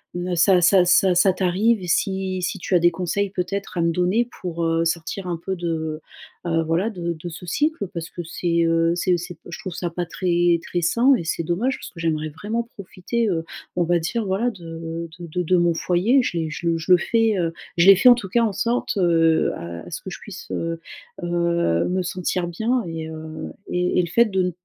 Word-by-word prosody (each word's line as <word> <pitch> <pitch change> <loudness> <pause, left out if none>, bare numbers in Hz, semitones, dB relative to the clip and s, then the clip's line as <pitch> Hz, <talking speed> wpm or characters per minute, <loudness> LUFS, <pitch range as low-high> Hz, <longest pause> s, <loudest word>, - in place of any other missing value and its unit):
n 175 0 -2
ça 180 +2 +5
ça 180 +1 +5
ça 180 0 +4
ça 185 +1 +4
t'arrive 195 +4 +1
et 180 - -6
si 190 +1 0
si - - -2
tu 185 - -1
as 175 - +6
des 175 +1 +4
conseils 190 +3 -2
peut-être 190 0 -4
à - - +2
me 170 0 +2
donner 185 +8 +1
pour, 170 -2 -3
heu, 165 0 +1
sortir 170 +3 -2
un 170 -1 -2
peu 190 -1 -2
de, 160 -2 -3 0.5
heu, 165 -1 +2
voilà 170 +7 +1
de 170 -3 -3
de 165 +2 -7
ce 165 +2 -9
cycle 290 - 0
parce 165 -1 -5
que 175 - -6
c'est, 170 +1 -1
heu, 165 0 +2
c'est 180 0 +1
c'est 175 +1 -7
p - - -37
je 175 - -6
trouve 185 -3 -6
ça 175 0 -3
pas 175 +1 -3
très 175 -1 +1
très 175 - -2
sain 240 +10 +4
et 170 - -3
c'est 170 - -1
dommage 215 +11 0
parce - - -8
que 170 - -13
j'aimerais 155 -2 -1
vraiment 210 +9 -3
profiter, 210 +4 -3
heu, 165 -3 -1 0.3
on 175 - +2
va 175 +1 +2
dire 220 +8 -2
voilà 200 +6 0
de 165 -2 -7
de 175 - -6
de 180 +3 -2
de 180 +2 +3
mon 170 -1 +3
foyer. 185 +11 +2
Je 175 - -2
l'ai 160 -1 -1
je 170 +2 -4
le 165 0 +2
je 165 +3 -3
le 180 - +9
fais, 225 +4 +2
heu, 165 -1 0 0.3
je 170 +3 +5
l'ai 195 - +10
fait 250 +7 +6
en - - +10
tout 195 -6 -6
cas 235 +3 +2
en 215 - 0
sorte, 235 +3 -1
heu, 165 -3 +3
à 85 0 -8
ce - - -5
que - - -7
je - - -7
puisse, - - -9
heu, 165 0 -3 0.4
heu, 170 - +1
me 185 +1 0
sentir 180 0 -2
bien 225 +8 0
et 160 -1 -5
heu 160 0 -7 0.2
et 180 0 0
et - - +6
le 170 - -4
fait 235 +6 +4
de 190 -4 0
ne 180 - 0
175 Hz, 235 wpm, -22 LUFS, 165-190 Hz, 0.5 s, l'ai